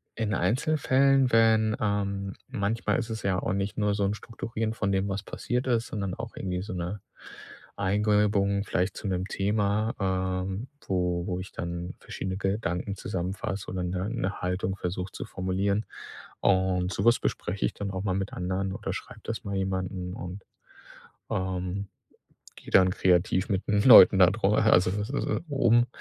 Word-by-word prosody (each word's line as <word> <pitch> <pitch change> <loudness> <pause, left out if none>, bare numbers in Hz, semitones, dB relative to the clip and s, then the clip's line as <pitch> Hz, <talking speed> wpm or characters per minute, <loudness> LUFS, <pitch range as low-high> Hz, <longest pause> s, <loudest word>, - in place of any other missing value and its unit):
in 110 -2 -1
Einzelfällen, 135 - +3
wenn, 110 -1 +4
ähm 100 -2 -1
manchmal 115 -3 -1
ist 120 -1 -4
es 110 -1 -5
ja 95 -2 +1
auch - - -1
nicht 100 +1 -2
nur 105 -1 +1
so 100 - 0
'n 100 - 0
Strukturieren 115 0 -4
von 100 -3 -1
dem, 95 0 +1
was 95 0 -3
passiert 125 +1 -3
ist, 120 -2 +1
sondern 100 -4 -3
auch 115 +3 -7
irgendwie 90 -1 -3
so 105 +2 -6
'ne 90 +3 -4 0.8
Eingebung 100 0 +2
vielleicht 95 0 -1
zu - - -5
'nem 95 -1 -1
Thema, 105 +2 0
ähm, 95 +2 -1 0.2
wo 90 -2 0
wo 90 -1 -2
ich 95 - -8
dann 85 +1 -5
verschiedene 95 0 -5
Gedanken 95 -1 -2
zusammenfasse 95 +2 -4
oder 95 0 -3
'ne 90 +3 -2
ne 105 -5 -2
Haltung 90 +1 -1
versuche 90 0 -4
zu - - -6
formulieren. 100 +3 -1 0.6
Und 95 -1 +2
so - - -2
was 120 0 +5
bespreche 95 +3 -2
ich - - -1
dann 100 - -4
auch 95 0 -4
mal 100 -3 0
mit 95 +1 -3
anderen 95 +2 -2
oder - - -4
schreibe - - -8
das 115 - -4
mal 100 -1 -3
jemanden 95 -1 -2
und, 90 +2 -7 0.9
ähm, 95 +1 -2 0.7
gehe - - -12
dann 95 -1 +6
kreativ 90 +1 +2
mit 95 -1 -1
'n 105 0 +3
Leuten 100 -6 +9
da 90 - +9
drüber 105 +1 +2
also, 90 -4 +5
das 105 +3 -3
ist 140 - -1
äh, - - 0
um 120 -4 +4
100 Hz, 170 wpm, -27 LUFS, 95-105 Hz, 0.9 s, Leuten